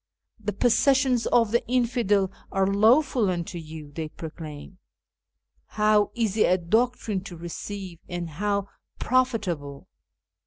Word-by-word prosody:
'The 210 -1 -3
possessions 250 +3 +3
of 230 -3 +3
the 235 - +2
infidel 235 -6 +1 0.2
are 195 0 +2
lawful 225 +3 +3
unto 175 0 -3
you,' 155 -2 -9
they 155 +1 -5
proclaim. 155 +2 -9 1.0
How 210 -1 +4
easy 220 -3 +1
a 185 - +3
doctrine 220 +2 0
to 175 - -8
receive, 175 +1 -7
and 175 -1 -4
how 200 +5 -1 0.3
profitable 195 - -1
200 Hz, 115 wpm, -25 LUFS, 170-230 Hz, 1.0 s, How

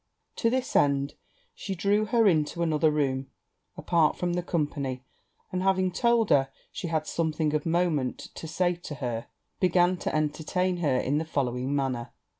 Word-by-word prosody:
To 230 - +2
this 255 +1 -1
end, 140 0 +3 0.4
she 200 - -5
drew 205 +3 +2
her 225 +2 +3
into 165 -1 +2
another 155 -1 +3
room, 135 -3 0 0.5
apart 165 -3 +2
from 175 -1 -1
the 175 - 0
company; 145 -6 -2 0.5
and 185 - -1
having 185 -1 +2
told 235 +3 +2
her 135 -1 +4 0.2
she 190 - -5
had 160 -2 -1
something 155 -2 -1
of 150 +1 -1
moment 165 -6 +1 0.2
to 160 - -7
say 175 +2 +1
to 165 -3 -7
her, 120 -4 -4 0.3
began 180 0 +3
to - - -3
entertain 160 +4 0
her 145 -7 +1
in 140 +4 +1
the - - -1
following 130 -2 -1
manner. 130 -4 -2
160 Hz, 165 wpm, -27 LUFS, 140-180 Hz, 0.5 s, her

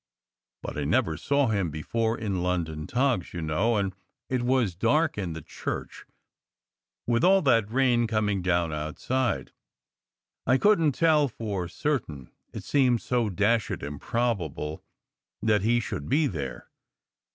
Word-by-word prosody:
But - - -5
I - - -1
never 80 +1 +1
saw 140 - +1
him 100 -5 0
before 110 +10 -1
in 100 -5 -2
London 80 -4 -2
togs, 125 -10 0
you 85 - -3
know, 95 +9 +1
and 100 -2 -1 0.4
it 130 -2 0
was 120 -5 +1
dark 145 - +2
in 95 -5 -3
the 80 -2 -8
church, - - -6 1.0
with 115 -1 +1
all 190 +1 +5
that 115 -7 +3
rain 120 -1 +2
coming 105 -3 0
down 85 -3 +1
outside. 100 +12 -2 1.0
I 130 +2 +5
couldn 165 -4 +4
t - - -13
tell 155 -3 +5
for 105 -7 -4
certain, 85 - -3 0.2
it - - -7
seemed 125 -4 +3
so 120 -3 0
dashed 105 +1 0
improbable 80 - -2 0.6
that 105 -2 +2
he 120 +4 +3
should 120 - -5
be 150 +4 +3
there. 70 - -5
110 Hz, 140 wpm, -27 LUFS, 85-125 Hz, 1.0 s, all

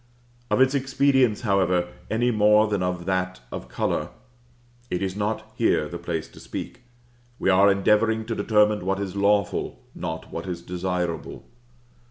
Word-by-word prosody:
Of - - +2
its 130 +1 +5
expedience, 135 -4 +2
however, 90 -4 +1 0.2
any 120 +3 +1
more 105 0 +5
than 105 -3 -1
of 90 -1 -2
that 95 0 -1
of - - -7
color, - - -1 0.8
it 90 - -1
is 95 -1 -2
not 110 +1 -3
here 110 -10 +2
the 85 +1 -7
place 80 -2 -3
to - - -15
speak; - - -7 0.6
we 95 - +2
are 100 +2 +6
endeavoring 110 +3 +2
to 115 - -3
determine 105 -1 +2
what 95 +1 -1
is 100 -1 -4
lawful, 100 -1 +1
not 80 0 -6
what 85 +3 -5
is 85 -2 -5
desirable. 90 -1 -3
100 Hz, 155 wpm, -24 LUFS, 90-110 Hz, 0.8 s, are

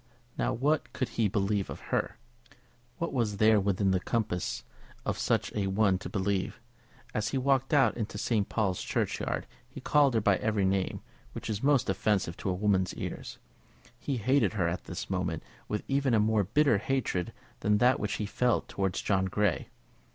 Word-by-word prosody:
Now, - - 0
what 145 +5 0
could 130 - -2
he 115 -2 +1
believe 100 0 0
of - - -6
her? - - 0 0.8
What 170 - -3
was 110 -6 0
there 110 0 +5
within 100 0 +1
the 95 - +2
compass 100 -4 -2 0.4
of - - -1
such - - 0
a 100 -2 0
one 95 -1 +2
to - - -7
believe? 100 -1 -1 0.5
As 110 0 0
he 135 - -1
walked 135 0 +1
out 135 -6 +4
into 110 -3 -4
St. 105 -1 0
Paul's 100 -5 0
Churchyard - - -1 0.2
he - - -9
called 140 -4 +3
her - - +4
by 100 -2 +3
every 110 -3 0
name 95 0 0 0.3
which - - -4
is 105 0 -3
most 135 -2 +3
offensive 95 -5 0
to - - -3
a - - +1
woman's 95 -1 +1
ears. - - -6 0.6
He 135 -1 -2
hated 130 +3 +2
her 95 -6 +1
at 85 +1 -3
this 85 - -5
moment 90 -4 -2 0.2
with 105 - -2
even 135 -3 +2
a - - +4
more 105 -1 +2
bitter 115 +1 +3
hatred 115 -5 -1 0.3
than 105 0 +2
that 125 +3 +4
which 105 - -2
he 105 - -2
felt 120 +3 +1
towards 95 -2 -2
John 95 -2 +2
Grey. 100 0 0
105 Hz, 180 wpm, -29 LUFS, 95-120 Hz, 0.8 s, there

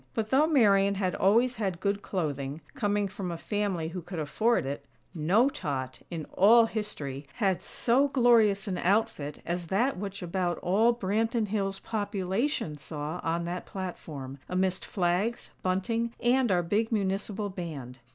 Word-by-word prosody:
But 220 -1 -2
though 285 +4 +5
Marian 200 -9 +4
had 185 -2 0
always 235 +5 +3
had 190 -5 -2
good 200 +1 0
clothing, 145 -6 -3
coming 205 -1 0
from 190 -2 -5
a 170 - -4
family 195 -5 -2
who 180 +1 -5
could 175 +2 -7
afford 160 - +1
it, 140 +1 -4 0.3
no 185 - +3
tot, 130 - -4
in 165 -3 -5
all 225 +4 +7
history, 150 -12 -5
had 195 -4 +1
so 255 +4 +2
glorious 230 -7 +4
an 185 -2 -2
outfit 190 -7 0
as 175 0 -3
that 230 +9 +1
which 200 0 -5
about 175 0 -1
all 210 +6 +4
Branton 225 0 0
Hills' 195 -2 -1
population 200 - -2
saw 150 +3 -5
on 170 +1 -1
that 175 +1 -4
platform, 150 -8 -6
amidst 185 0 0
flags, 185 +5 0
bunting 225 +6 -1
and 245 -1 +3
our 175 -1 +3
big 210 +7 0
Municipal 205 0 -1
Band. 145 -9 -7
195 Hz, 150 wpm, -29 LUFS, 170-220 Hz, 0.3 s, all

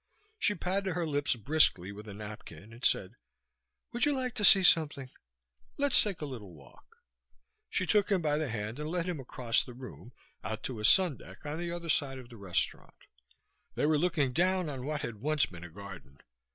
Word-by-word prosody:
She 210 - +3
patted 190 +1 -2
her 175 0 -1
lips 145 -3 +1
briskly 115 - +2
with 105 +2 -10
a 105 - -8
napkin 105 -2 -10
and 120 +3 -14
said, 95 - +1 0.8
"Would 240 - -1
you 295 - +3
like 255 -3 -2
to 210 - -3
see 195 -2 +8
something? 150 -7 +4 0.7
Let's 285 -2 +5
take 200 -6 -3
a - - -2
little 110 - -9
walk." 70 -3 -19 0.7
She 185 - 0
took 205 +4 +2
him 195 - +3
by 150 -2 0
the 155 -4 -2
hand 110 +3 -5
and 150 +1 -4
led 170 0 -1
him 180 -4 -3
across 125 -2 0
the 125 - -10
room, 125 -1 -11 0.3
out 110 0 -5
to 125 -4 -5
a - - -6
sundeck 180 - +3
on 150 +2 -4
the 175 0 -3
other 170 -1 -6
side 135 -3 +1
of 125 -2 -11
the 120 - -12
restaurant. 100 -4 -2 0.8
They - - 0
were 150 0 +3
looking 160 -6 +1
down 180 +3 +1
on 130 -1 -6
what 150 -1 -2
had 115 -2 -5
once 150 +5 +1
been 85 -1 -11
a 85 - -9
garden. 90 -6 -11
145 Hz, 200 wpm, -31 LUFS, 110-175 Hz, 0.8 s, see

